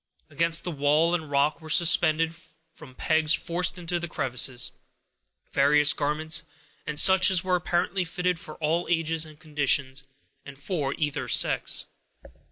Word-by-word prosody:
Against 165 +3 +1
the 175 - -4
walls 150 +3 +1
and 160 -4 -3
rock 145 +3 0
were 160 - -11
suspended, 165 -1 +3 0.4
from 140 -6 -15
pegs 160 +1 +1
forced 175 +2 -3
into 175 0 -3
the 175 - -5
crevices, 125 -3 -1 0.8
various 150 +1 +3
garments, 155 +2 -1 0.5
and 150 -1 -1
such 190 +1 +6
as 185 -2 +3
were 185 -1 0
apparently 180 +1 -2
fitted 180 0 -3
for 155 - -10
all 165 +2 -2
ages 165 -1 -1
and 155 -1 -17
conditions, 140 -3 -1 0.4
and 145 -1 -12
for 145 -2 -4
either 150 -2 -3
sex. - - +2
155 Hz, 145 wpm, -25 LUFS, 145-170 Hz, 0.8 s, such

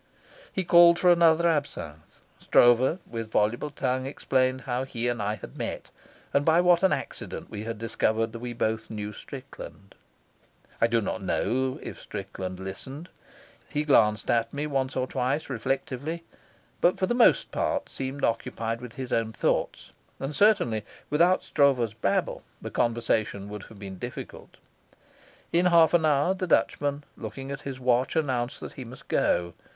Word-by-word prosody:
He 190 - -1
called 170 0 +7
for 180 0 +5
another 170 -1 +5
absinthe. 140 - -3 0.2
Stroeve, 120 +6 +4
with 115 -1 -6
voluble 110 +7 +1
tongue, 130 -2 -2
explained 130 -1 0
how 125 0 -2
he 120 -3 -3
and 120 -2 -1
I 105 +1 -1
had 105 - -11
met, - - -5 0.4
and 140 - +3
by 160 +2 +4
what 175 -1 +5
an 190 - +4
accident - - -4
we 105 0 -5
discovered 115 0 0
that 115 - -6
we 120 +1 -5
both 110 -1 -2
knew 105 -1 -5
Strickland. 130 -6 -10 0.9
I 115 - +5
do 115 -1 +1
not 110 +1 -3
know 130 +7 0
if - - -7
Strickland 95 -2 -6
listened. 130 - -7 0.6
He 150 0 -1
glanced 105 -7 +3
at 115 -1 +1
me 145 +1 -3
once 135 -3 -1
or 130 - 0
twice 130 +4 -2
reflectively, 135 +5 -3 0.6
but 175 - +4
for 185 - +1
the 215 - 0
most 240 -1 +4
part - - -1
seemed 135 +1 -5
occupied 115 0 -1
with 125 -2 -9
his 130 -2 -5
own 115 -1 +1
thoughts; - - -1 0.3
and 135 +2 -4
certainly 130 - +3 0.3
without 170 +5 +4
Stroeve's 130 -7 +2
babble 100 -3 -1 0.2
the - - -7
conversation 110 -3 0
would 105 -1 -7
have 110 - -14
been 95 -2 -8
difficult. - - -8 0.9
In 175 +2 +3
half 170 -2 +5
an 165 -2 +4
hour 150 +5 +3
the 185 -1 -3
Dutchman, 145 -3 +1
looking 135 +5 -7
at 140 +1 -5
his 135 -2 -6
watch, 125 0 +1
announced 130 -4 -1
that - - -7
he 130 - -7
must 125 +1 -12
go. 85 -1 +1
130 Hz, 160 wpm, -27 LUFS, 115-150 Hz, 0.9 s, called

